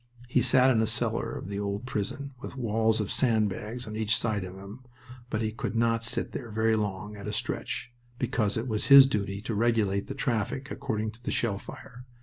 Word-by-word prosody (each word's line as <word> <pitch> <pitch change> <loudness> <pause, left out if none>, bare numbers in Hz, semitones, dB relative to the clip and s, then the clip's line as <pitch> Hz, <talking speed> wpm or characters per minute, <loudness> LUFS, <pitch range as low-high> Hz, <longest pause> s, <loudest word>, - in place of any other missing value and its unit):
He 125 - +2
sat 130 0 +5
in 115 -3 +3
a 110 - +1
cellar - - -1
of - - -6
the 100 0 -4
old 100 +2 -3
prison, 130 +5 -4
with 140 - -8
walls 110 -2 +1
of 105 - -2
sandbags 110 0 0
on 110 -1 -7
each 110 0 +1
side 110 -4 -1
of 90 0 -8
him, 100 +5 -10 0.5
but 110 -1 -1
he 110 - -1
could 110 -1 -4
not 115 0 +2
sit 115 - +2
there 120 - -6
very 110 +1 +2
long 105 -1 -3
at 100 0 -8
a - - -2
stretch, 120 - -3 0.2
because 115 -4 0
it 115 +3 -2
was 110 -3 -1
his 140 -1 +11
duty 100 -5 -2
to 115 - -3
regulate 105 -3 +1
the - - -5
traffic 125 +4 -2
according 110 -5 -2
to 115 +2 -18
the - - -4
shell 100 -4 0
fire. 125 +3 -11
110 Hz, 210 wpm, -28 LUFS, 105-120 Hz, 0.5 s, his